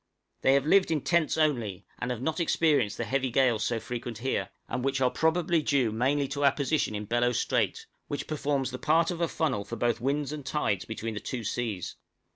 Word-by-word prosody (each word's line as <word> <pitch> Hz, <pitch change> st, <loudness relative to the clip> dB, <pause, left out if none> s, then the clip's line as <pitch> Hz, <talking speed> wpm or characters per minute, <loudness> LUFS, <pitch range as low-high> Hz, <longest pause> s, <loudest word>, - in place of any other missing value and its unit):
They 135 Hz, -, +5 dB
have 140 Hz, 0 st, +2 dB
lived 185 Hz, +4 st, +4 dB
in 155 Hz, -3 st, +1 dB
tents 170 Hz, -1 st, +1 dB
only, 120 Hz, -, 0 dB
and 125 Hz, -, -3 dB
have 125 Hz, 0 st, -3 dB
not 160 Hz, +3 st, -1 dB
experienced 150 Hz, -10 st, +2 dB
the -, -, -1 dB
heavy 130 Hz, +4 st, 0 dB
gales 120 Hz, -3 st, +2 dB
so 115 Hz, -1 st, 0 dB
frequent 120 Hz, -1 st, -5 dB
here, 130 Hz, +4 st, -2 dB, 0.2 s
and 125 Hz, -, -3 dB
which 135 Hz, 0 st, 0 dB
are 130 Hz, -1 st, +3 dB
probably 165 Hz, 0 st, +2 dB
due 135 Hz, -6 st, +2 dB
mainly 135 Hz, +5 st, +1 dB
to 145 Hz, 0 st, -2 dB
our 140 Hz, -, +6 dB
position 145 Hz, -5 st, 0 dB
in 105 Hz, +1 st, -4 dB
Bellot 120 Hz, +3 st, +1 dB
Strait, -, -, 0 dB, 0.2 s
which 145 Hz, -, -3 dB
performs 140 Hz, -3 st, -1 dB
the 125 Hz, -, -6 dB
part 165 Hz, +2 st, +3 dB
of 175 Hz, -1 st, -4 dB
a 170 Hz, -, +2 dB
funnel 155 Hz, -11 st, -1 dB
for 100 Hz, +4 st, -6 dB
both 120 Hz, 0 st, 0 dB
winds 140 Hz, +2 st, 0 dB
and 150 Hz, -2 st, -6 dB
tides 130 Hz, -8 st, -1 dB
between 110 Hz, 0 st, -4 dB
the 105 Hz, -, -4 dB
two 120 Hz, +2 st, -5 dB
seas. 105 Hz, -4 st, -3 dB
135 Hz, 215 wpm, -28 LUFS, 115-150 Hz, 0.2 s, our